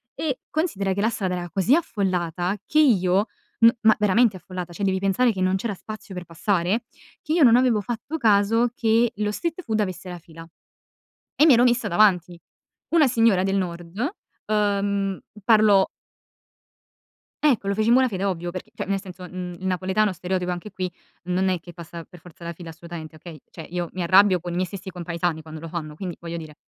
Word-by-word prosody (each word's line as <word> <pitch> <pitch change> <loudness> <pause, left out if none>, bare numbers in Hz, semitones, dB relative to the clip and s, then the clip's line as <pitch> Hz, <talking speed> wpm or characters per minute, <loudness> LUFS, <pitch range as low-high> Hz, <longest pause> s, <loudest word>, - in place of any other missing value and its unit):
E, 280 -5 -2
considera 205 - -1
che 200 - -2
la 220 - +3
strada 185 -5 -2
era 175 -1 -5
così 195 - +3
affollata 185 - -1
che 305 - +2
io 195 -8 +4 0.4
m 230 - +9
ma 220 -1 +5
veramente 210 0 +3
affollata, 180 -1 -7
cioè 200 - -5
devi 190 0 +1
pensare 210 +5 +2
che 190 - -6
non 185 +1 +2
c'era 205 +2 -2
spazio 215 +1 -9
per 180 -1 -6
passare, 180 +5 0 0.4
che 305 - -2
io 330 -3 +4
non 235 -2 +7
avevo 245 -4 +3
fatto 240 +9 -4
caso 225 +1 +3
che 230 +1 +2
lo 210 0 0
street 335 - -3
food 220 -7 -2
avesse 185 -2 -3
la 180 - -6
fila 165 0 -13 0.9
e 305 - +5
mi 285 - +8
ero 240 - +5
messa 240 -3 +2
davanti. 180 -3 +3 0.6
Una 310 -4 +6
signora 225 -6 +3
del 195 +1 0
nord, 175 0 -4 0.5
uhm, 200 -2 0 0.3
parlo 210 -3 +5 1.6
Ecco, 205 -6 0
lo 200 - +1
feci 215 +1 0
in 235 - +6
buona 260 0 +4
fede 195 -3 -3
ovvio, 175 -3 -2
perché, 185 +1 -8
cioè, - - -5
nel 195 0 -1
senso, 180 -1 -10
mhmm, 180 -1 -6
il 190 - -5
napoletano 190 +2 +1
stereotipo 180 +1 -2
anche 180 +4 -5
qui 185 -1 -3 0.3
non 185 +1 0
è 180 -3 -1
che 175 - -12
passa 170 0 -9
per 180 - -14
forza 170 0 -16
la 170 - -4
fila 170 0 -9
assolutamente, 165 -1 -9
okay? 160 0 -11
Cioè, 160 - -9
io 175 -1 -3
mi 185 - -3
arrabbio 185 +1 +5
con 175 +1 -6
i - - -3
miei 185 +1 0
stessi 190 0 -8
compaesani 170 -2 -3
quando 155 0 -9
lo 165 - -7
fanno, 155 -3 -5
quindi 175 +1 -6
voglio 170 0 -5
dire 155 -2 -10
190 Hz, 200 wpm, -24 LUFS, 175-215 Hz, 1.6 s, m